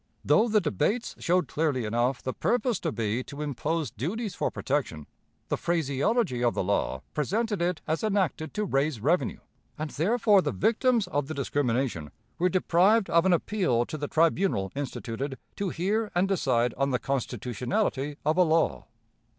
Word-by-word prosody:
Though 225 - +4
the 215 -1 +3
debates 210 - -1
showed 180 +1 +1
clearly 145 -6 0
enough 120 +4 0
the 130 - -2
purpose 245 -4 0
to 165 - -2
be 115 +1 -1
to 145 +1 -6
impose 150 +3 -2
duties 200 - -3
for - - -1
protection, 130 - -2 0.4
the - - 0
phraseology 165 - 0
of 120 - +2
the - - 0
law 90 -8 -1
presented 205 - -1
it 175 -1 0
as 160 +5 -1
enacted 195 -7 0
to 210 0 0
raise 140 - 0
revenue, 160 - 0 0.4
and 155 0 -4
therefore 205 +4 +3
the - - -1
victims 230 +1 +2
of 145 -6 -2
the 155 - -5
discrimination 125 - -1 0.3
were 180 +2 +3
deprived 190 +4 +3
of 170 +2 +4
an - - +4
appeal 170 - +1
to - - -6
the 145 - -2
tribunal 165 - +1
instituted 135 -1 -4 0.2
to 200 -2 -1
hear 205 +6 -1
and 180 +2 +3
decide 125 -11 +1
on 140 0 +2
the 125 - +1
constitutionality 130 - -2
of 155 +3 +2
a 180 - +6
law. 165 -1 +1
155 Hz, 165 wpm, -27 LUFS, 130-195 Hz, 0.4 s, a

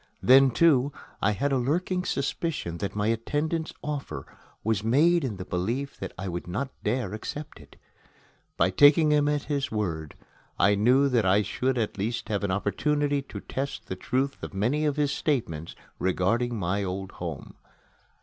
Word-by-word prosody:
Then, 135 +1 +7
too, 140 0 +4 0.3
I 105 - +3
had 140 +8 -1
a 135 - +2
lurking 180 +8 0
suspicion 140 - -2
that 100 - -3
my 105 0 0
attendant's 150 +8 -1
offer 140 - -4 0.4
was 110 -2 0
made 155 +9 +4
in 115 -7 -3
the 90 - -6
belief 115 +12 -2
that 95 - -5
I 95 +1 -4
would 85 -1 -4
not 125 +10 -3
dare 110 -2 -1
accept 145 - -6
it. 70 -2 -16 0.8
By 85 +3 +3
taking 145 - +6
him 145 -1 +3
at 150 -1 0
his 140 -2 -1
word, 85 -8 -3 0.4
I 105 - +4
knew 125 +7 +4
that 120 -4 +2
I 100 +3 +4
should 125 +6 -1
at 110 -3 -2
least 110 +2 -2
have 105 -1 -1
an 100 - 0
opportunity 145 +9 0
to 135 - -9
test 135 +1 -4
the 95 - -4
truth 130 +8 -1
of - - -7
many 125 +10 +1
of 145 -2 +1
his 145 -2 +1
statements 85 - -2 0.2
regarding 115 +7 +1
my 100 +1 -1
old 95 +1 -4
home. 80 -5 -5
120 Hz, 170 wpm, -27 LUFS, 95-145 Hz, 0.8 s, Then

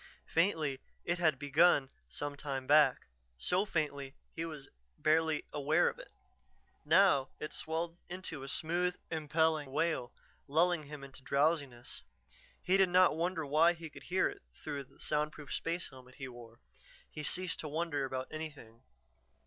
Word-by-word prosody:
Faintly 160 -6 +1 0.3
it 175 0 0
had 155 -5 +3
begun 145 -1 +4 0.2
some 145 0 -4
time 135 -2 -4
back, 145 -2 +5 0.3
so 180 - +1
faintly 145 -6 -2 0.2
he 165 - -2
was 155 -4 -7 0.3
barely 160 0 +2
aware 150 +4 +3
of - - -9
it. - - -11 0.7
Now 145 -9 +5
it 150 - -5
swelled 165 +2 -3
into 175 -5 -6
a 135 - -7
smooth, 175 +5 0 0.2
impelling 160 -2 +1
wail 155 -4 0 0.4
lulling 160 +2 +2
him 145 -1 -8
into 135 -1 -11
drowsiness. 140 -3 0 0.6
He 185 +2 +4
did 190 -2 +5
not 180 -2 +5
wonder 165 -1 -1
why 155 +5 +5
he 165 -2 -9
could - - -11
hear 185 +1 +1 0.2
through 140 -1 -4
the - - -24
soundproof 150 -1 -2
space 170 +1 -2
helmet 130 -1 -14
he 135 - -6
wore; 120 -2 -12 0.5
he 150 - -6
ceased 180 +4 -1
to 155 - -4
wonder 155 -1 -1
about 130 -1 -3
anything. 145 -8 -8
155 Hz, 150 wpm, -34 LUFS, 140-170 Hz, 0.7 s, back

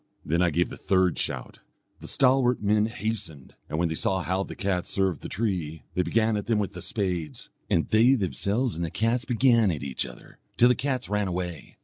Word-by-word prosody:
Then 85 +3 +1
I 90 - +4
gave 85 +2 +1
the - - -8
third 95 -2 +1
shout. - - -3 0.4
The - - -9
stalwart 130 -1 +3
men 105 +1 +2
hastened, 110 - -5 0.2
and 75 - -3
when 85 +1 +2
they 80 - -2
saw 95 +3 0
how 95 +5 0
the - - -6
cats 95 -3 -1
served 95 -6 0
the - - -7
tree, 90 -8 -2
they 90 - +1
began 110 +6 +1
at 105 - -3
them 115 -2 +2
with 105 -2 -2
the - - -8
spades; 90 -7 -2 0.2
and 85 - +2
they 115 +5 +5
themselves 105 +3 -1
and 85 - -3
the 85 - -2
cats 115 +7 0
began 115 -3 +3
at 80 -5 -3
each 70 -3 -3
other, 60 - -14 0.2
till 120 - +6
the - - +5
cats 130 -1 -2
ran 105 0 0
away. 90 -4 -5
100 Hz, 215 wpm, -26 LUFS, 85-115 Hz, 0.4 s, till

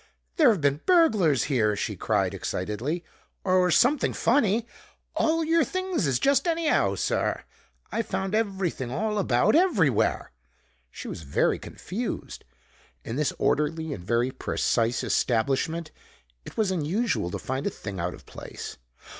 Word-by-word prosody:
"There've 245 - +5
been 140 +1 +1
burglars 215 - +4
here," 110 -7 +1
she - - -3
cried - - 0
excitedly, 115 - -3 0.4
"or 185 -1 +3
something 285 - +3
funny! 230 -3 +2 0.5
All 325 +1 +2
your 325 +1 +3
things 370 - -1
is 130 -3 +2
just 280 - +2
anyhow, 330 -1 +2
sir. - - -1 0.5
I 230 - 0
found 190 -3 -3
everything 190 - -1
all 210 - -1
about 150 - +2
everywhere!" 205 - +2 0.6
She - - -9
was - - -6
very 70 -3 +1
confused. 225 +6 -6 0.6
In 115 - -5
this 150 +1 +1
orderly 155 +1 0
and 90 - -8
very 120 +6 +1
precise 115 -2 0
establishment 140 +7 0 0.5
it - - -11
was 215 -4 +1
unusual 185 - 0
to - - -4
find 130 +7 -3
a - - +2
thing 100 - -7
out 85 +1 -2
of - - -17
place. - - -9
170 Hz, 140 wpm, -26 LUFS, -, 0.6 s, There've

